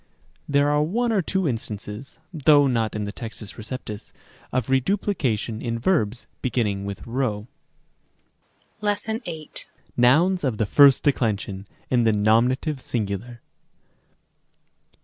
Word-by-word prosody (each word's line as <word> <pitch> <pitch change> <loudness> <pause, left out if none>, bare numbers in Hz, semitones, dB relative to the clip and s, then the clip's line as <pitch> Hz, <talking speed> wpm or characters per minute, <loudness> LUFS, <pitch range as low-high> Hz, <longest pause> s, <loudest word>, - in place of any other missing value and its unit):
There 145 0 +3
are 150 0 +3
one 230 +10 0
or 205 -3 +2
two 190 +1 -1
instances, 110 0 -5 0.2
though 145 -2 +5
not 115 -5 0
in 105 -1 -2
the 100 - -4
T. 115 - -10 0.3
R., 110 -1 -6 0.6
of 130 -3 -1
reduplication 130 - 0
in 115 -1 -2
verbs 120 - 0 0.2
beginning 105 -6 -1
with 100 -1 -6
p. - - -11 1.7
§8. 205 - -2 0.3
Nouns 160 +10 +4
of 130 -6 0
the 110 - +1
first 140 +5 +6
declension, 105 -7 0 0.2
in 125 -2 +3
the 110 - +4
nominative 125 +7 +2
sin 115 -4 -1
gular. 105 +5 -6
125 Hz, 120 wpm, -24 LUFS, 110-150 Hz, 1.7 s, first